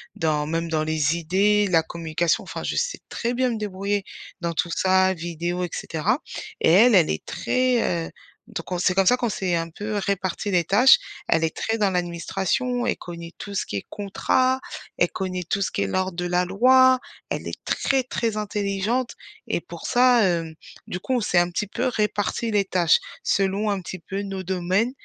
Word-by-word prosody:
dans 150 -2 0
même 165 +1 -2
dans 155 -1 0
les 155 0 +1
idées, 200 +5 +2
la 165 -3 +4
communication 165 0 -1
enfin - - -6
je - - -2
sais 485 +1 -1
très 235 +1 -2
bien 255 +1 +1
me 230 - -2
débrouiller 200 -1 -2 0.3
dans 170 -2 -2
tout 170 +2 -1
ça, 190 0 +3
vidéo 175 +1 -3
et - - -7
cetera. 155 -2 -1 0.4
Et - - +4
elle, 220 +6 +7
elle 175 -4 +5
est 75 - -3
très 245 -10 0
heu, - - -12 0.4
donc - - -7
on - - 0
c'est 185 +1 +2
comme 195 +1 +3
ça 245 - +6
qu'on 245 -2 -1
s'est 185 -3 -1
un 165 0 -2
peu 205 +5 -4
réparties 200 0 -2
les 175 -3 +2
tâches. 230 - +7 0.3
Elle 165 0 +3
est 160 - -3
très 225 - -1
dans 205 -3 +2
l'administration, 190 +8 -1
elle 240 - 0
connait 170 -1 -8
tout 200 -1 -7
ce - - 0
qui 100 - -4
est - - -6
contrat, 255 +6 +1 0.4
elle 175 - +3
connaît 185 -1 -3
tout 200 - 0
ce 195 - 0
qui - - -2
est - - -1
l'ordre 185 - -1
de 175 - -2
la 175 0 +1
loi, 255 +7 +5 0.3
elle - - -3
est - - -7
très 270 -1 +1
très 230 -3 -2
intelligente 210 +3 -1 0.3
et - - -1
pour - - -8
ça, 245 -2 +5
hem, 165 -3 -1 0.3
du 180 - -4
coup 260 - -3
on 245 - +1
s'est 190 -4 +1
un 175 0 +2
petit 205 +4 -2
peu 205 - -2
réparti 215 0 -1
les 205 -2 +2
tâches. 175 -3 +3 0.3
Selon 200 +2 +1
un 200 -1 0
petit 185 +1 -7
peu 195 +4 -5
nos 195 -1 -5
domaines 185 +5 0
190 Hz, 205 wpm, -24 LUFS, 170-215 Hz, 0.4 s, elle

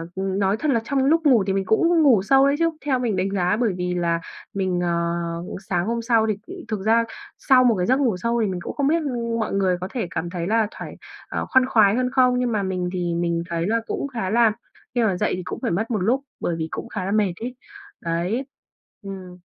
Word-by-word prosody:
nói 195 +1 0
thật 300 +3 +1
là 235 - +3
trong 270 +2 0
lúc 325 +3 +4
ngủ 245 -8 +5
thì 195 - +1
mình 195 0 0
cũng 330 - +3
ngủ 245 -9 +5
sâu 270 +5 +5
đấy 280 - +2
chứ, 330 0 +3 0.2
theo 265 -3 +1
mình 230 -5 0
đánh 185 +1 0
giá, 185 0 +1
bởi 230 -5 +1
vì 180 0 -2
là 170 -1 0 0.3
mình, 185 -3 -1
ờ, 170 0 -1 0.3
sáng 175 -2 +1
hôm 235 0 -1
sau 225 -1 +2
thì 225 - -5
thực 215 -2 -2
ra 230 +1 +4 0.3
sau 260 -2 +4
một 240 -3 +4
cái 180 -2 0
giấc 260 +6 +2
ngủ 235 -9 +1
sâu 235 +4 0
thì 215 - +1
mình 185 -2 -3
cũng - - -5
không 280 -1 +1
biết 330 +2 +3 0.4
mọi 220 - -2
người 190 -2 +2
có 185 - -3
thể 235 -8 -2
cảm 170 +2 -3
thấy 175 -1 -4
là 220 0 +2
thoải - - -9 0.3
ờ, - - -2
khoan 260 -1 +5
khoái 215 -5 +4
hơn 250 0 +1
không, 250 -1 +3
nhưng 250 -1 0
mà 210 -3 0
mình 185 -2 -2
thì 175 -2 -1
mình 170 0 0
thấy 170 +1 -1
là 230 +1 +1
cũng - - -2
khá 230 -9 -3
là 230 0 +4 0.4
khi 240 - +2
mà 195 -5 +1
dậy - - 0
thì 180 - -5
cũng - - -5
phải - - -1
mất 220 +7 -1
một 220 - +1
lúc 235 +9 +1 0.2
bởi 170 - -1
vì 160 -1 -3
cũng - - -6
khá 185 -4 -4
là 195 - -2
mệt 205 -4 +2
ấy, 250 +2 -5 0.5
đấy. 175 +10 -1 0.6
Ừm. 190 -3 -8
205 Hz, 245 wpm, -23 LUFS, 180-245 Hz, 0.6 s, ngủ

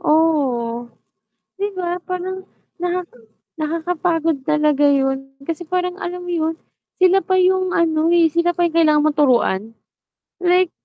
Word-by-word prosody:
Oo. 270 -8 +1 0.7
'Di 405 +1 -1
ba? 355 -1 -2
Parang 370 +1 -5 0.3
naka 355 +1 -1 0.6
nakakapagod 325 -2 -1
talaga 300 -1 +2
'yun, 270 -1 0
kasi 330 +3 -5
parang 360 +1 -2
alam 360 -1 -5
mo 355 - -6
'yun, 325 -1 -1 0.5
sila 370 +1 +6
pa 375 - 0
yung 370 0 +2
ano, 320 -1 +2
eh, 330 -2 +4
sila 340 +2 +1
pa 350 - -1
yung 335 -1 -4
kailangan 305 -2 +4
mo 310 - +3
turuan 235 -7 +1 0.7
like 360 0 +3
330 Hz, 140 wpm, -19 LUFS, 295-360 Hz, 0.7 s, sila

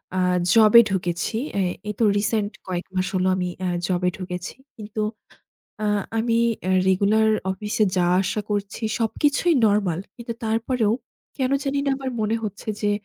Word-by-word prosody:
আ - - 0 0.4
জবে 225 0 +8
ঢুকেছি। 180 +1 -2 0.2
এ - - +2 0.3
এই 210 - -2
তো - - +3
রিসেন্ট 210 0 0 0.2
কয়েক 180 -1 -3
মাস 185 0 0
হলো 185 0 +1
আমি 180 -1 -1
অ্যা 185 - -1 0.2
জবে 180 -1 +1
ঢুকেছি। 180 -1 -5 0.2
কিন্তু 215 0 -5 0.8
আ - - 0 0.3
আমি 230 +1 +1 0.3
এ - - +2 0.2
রেগুলার 205 +4 +3 0.2
অফিসে 210 +2 0
যাওয়া 175 0 +3
আসা 205 +2 -1
করছি, 205 +2 -3 0.2
সবকিছুই 290 +8 +1
নরমাল। 200 -5 +2 0.2
কিন্তু 235 -1 -5
তারপরেও 225 0 +1 0.4
কেন 260 -2 0
জানিনা 280 0 0
আমার 265 -1 -4
মনে 215 +1 +1
হচ্ছে 205 +1 -6
যে 205 - +1
210 Hz, 150 wpm, -23 LUFS, 185-230 Hz, 0.8 s, জবে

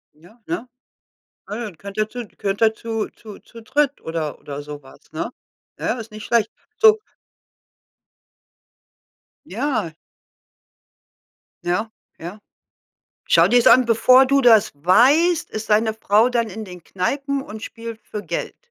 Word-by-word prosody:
Ja, 175 +10 -20
ne? 340 -7 -4 0.8
Ah, 205 - -6
ja, 235 - -4
dann 200 -6 -8
könnt 200 +3 -10
ihr 215 0 +1
zu 245 0 -7
könnt 200 +1 -2
ihr 220 0 +4
zu 225 -1 -4
zu 215 -3 -13
zu 230 - -14
dritt 285 +4 0
oder 160 -2 -4
oder 145 0 -7
so 145 0 -9
was, 135 - -19
ne? 160 +8 -4 0.5
Ja, - - -2
ist 225 0 -9
nicht 215 0 -9
schlecht. 230 -2 +1 0.3
So 440 -1 +6 2.5
Ja. 220 - -2 1.7
Ja, 180 +6 -1 0.3
ja. 175 +6 -8 0.9
Schau - - +6
dir's 245 -1 +3
an, 255 -1 +6
bevor 255 +3 +5
du 275 +1 +3
das 225 -4 +5
weißt, 260 - +3
ist 215 0 -6
deine 220 +1 +3
Frau 220 +1 +3
dann 235 -3 -1
in 220 +3 -7
den 180 -3 -11
Kneipen 275 - -2
und 215 -4 -10
spielt 230 -1 -8
für 210 - -7
Geld. - - -4
220 Hz, 145 wpm, -21 LUFS, 195-245 Hz, 2.5 s, So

